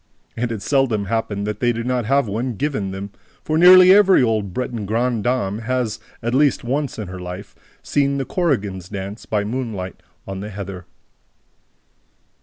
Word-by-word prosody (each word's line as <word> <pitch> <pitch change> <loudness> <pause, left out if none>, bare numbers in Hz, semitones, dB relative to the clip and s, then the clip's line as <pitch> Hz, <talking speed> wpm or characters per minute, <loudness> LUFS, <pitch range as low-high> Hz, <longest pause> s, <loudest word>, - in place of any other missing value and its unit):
And 120 0 -2
it 110 -3 -5
seldom 130 -8 +1
happened 100 -1 -2
that 105 0 -3
they 120 - +2
did 115 0 -4
not 125 -2 0
have 135 +1 +2
one 115 +4 -2
"given" 135 -6 -2
them; 95 +1 -6 0.3
for 155 - -1
nearly 180 +2 +8
every 195 -7 +6
old 110 -4 0
Breton 115 0 -4
grandame 115 -2 0
has, 125 -2 -2 0.2
at 120 +1 -1
least 140 0 +3
once 135 +3 -2
in 110 -3 -5
her 90 0 -7
life, 90 +2 -8 0.3
seen 140 -1 +1
the 135 - -2
"korrigans" 100 - -1
dance 100 +1 -7
by 105 -2 0
moonlight 105 -5 -4 0.3
on 95 -1 -5
the 105 +2 -6
heather. 95 -3 -7
115 Hz, 165 wpm, -21 LUFS, 100-130 Hz, 0.3 s, nearly